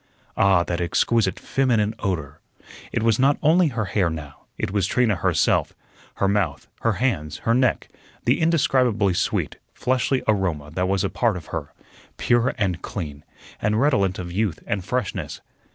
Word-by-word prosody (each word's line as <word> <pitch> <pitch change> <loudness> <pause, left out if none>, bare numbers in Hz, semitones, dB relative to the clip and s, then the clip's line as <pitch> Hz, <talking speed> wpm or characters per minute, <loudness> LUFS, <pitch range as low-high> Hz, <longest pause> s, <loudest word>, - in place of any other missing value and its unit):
Ah, 95 -3 +4
that 85 0 -3
exquisite 100 +3 +1
feminine 115 -6 +1
odor! 80 -7 -3 0.5
It - - -1
was 115 0 +3
not 140 +2 +4
only 165 +3 +5
her 115 -6 -2
hair 95 -2 +1
now, 75 -3 -8
it - - -2
was 100 -2 +1
Trina 115 -5 +2
herself - - +1 0.4
her 100 - +1
mouth, 95 -8 0
her 115 - +1
hands, 90 - -1
her 115 - +3
neck; 130 -1 +2 0.4
the 125 +7 +2
indescribably 130 - +2
sweet, - - -1 0.2
fleshly 130 +1 0
aroma 90 -8 0
that 90 +3 -1
was 95 0 +1
a 100 - 0
part 115 -6 +1
of 80 - -9
her, - - -4 0.5
pure 120 +3 +2
and 95 -6 -1
clean, 75 -7 -6 0.4
and 105 +1 +1
redolent 100 -9 +2
of 85 -1 -6
youth 95 -3 -1
and 100 -2 -2
freshness. 125 0 -3
100 Hz, 160 wpm, -23 LUFS, 90-120 Hz, 0.5 s, only